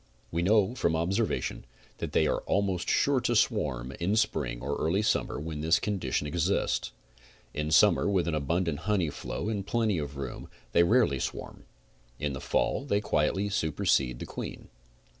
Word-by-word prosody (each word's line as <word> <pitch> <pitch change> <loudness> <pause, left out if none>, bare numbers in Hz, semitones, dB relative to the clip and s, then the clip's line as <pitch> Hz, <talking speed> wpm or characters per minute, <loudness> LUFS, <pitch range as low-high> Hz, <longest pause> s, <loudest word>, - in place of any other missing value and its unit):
We 85 - 0
know, 105 +3 +3
from 85 -10 0
observation, 95 +7 -1 0.4
that - - -4
they - - +3
are - - +1
almost 95 -3 0
sure 140 -2 +3
to 120 - 0
swarm 70 - +1
in 95 +5 +1
spring 105 - 0
or 70 +3 -2
early 95 +7 +1
summer 105 - 0
when 75 0 -5
this 80 +2 +4
condition, 95 -9 -1
exists. 85 +5 0 0.6
In 75 +1 -2
summer, 80 - +5
with 95 -4 +1
an 85 - 0
abundant 80 +1 0
honey 90 -8 +2
flow - - -5
and 105 -3 -2
plenty 105 -3 0
of 70 -1 -5
room, 65 -3 -6 0.2
they 85 - +5
rarely 105 - +3
swarm. - - -5 0.5
In 70 +1 -2
the 65 - -6
fall - - 0
they 100 -8 +1
quietly 95 0 0
supercede 70 -8 +1
the - - -6
queen. - - -7
85 Hz, 165 wpm, -29 LUFS, 75-105 Hz, 0.6 s, summer